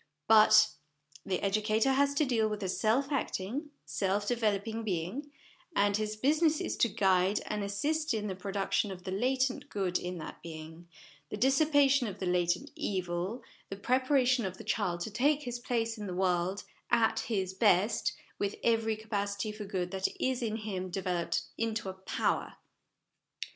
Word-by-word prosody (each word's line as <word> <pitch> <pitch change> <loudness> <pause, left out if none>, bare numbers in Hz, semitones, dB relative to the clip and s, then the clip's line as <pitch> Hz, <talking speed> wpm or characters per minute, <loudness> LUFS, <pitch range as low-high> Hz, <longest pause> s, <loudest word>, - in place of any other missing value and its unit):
But 215 0 +7 0.5
the 185 - -2
educator 215 +5 +2
has 280 +1 +2
to 300 - +3
deal 225 -4 +1
with 210 -1 -4
a 190 - -2
self 225 +9 +1
acting, 275 - -2 0.2
self 200 +1 -1
developing 225 -1 0
being, 210 - -3 0.4
and 200 0 +3
his 215 0 -1
business 305 +6 +2
is - - -2
to 235 - +3
guide, 190 0 +2
and 210 -1 -2
assist 300 +11 -1
in, 215 -3 -1
the 195 - -2
production 195 +2 -1
of 185 -2 -8
the 185 - -5
latent 260 +6 0
good 190 -3 -1
in 180 0 -5
that 155 - -8
being, 160 +1 -9 0.4
the - - -4
dissipation 275 0 +4
of 200 -2 -6
the 190 - -4
latent 175 -1 0
evil, 185 +4 -2 0.3
the 195 - -4
preparation 255 +3 +2
of 185 -2 -4
the - - -9
child 175 -2 -1
to 215 - -4
take 285 +7 +2
his 245 -2 -4
place 230 -2 -1
in 210 - -5
the 180 - -4
world 185 +1 0 0.3
at 230 -2 +3
his 190 -5 -2
best, 200 +1 +3 0.3
with 200 0 -1
every 225 -1 +2
capacity 205 -1 -3
for 210 0 -7
good 185 -3 -3
that 190 0 0
is 260 -1 0
in 220 -2 -1
him 195 -4 -4
developed 175 -2 -1 0.2
into 225 -3 -1
a - - -5
power. 190 0 -2
210 Hz, 165 wpm, -31 LUFS, 190-245 Hz, 0.5 s, But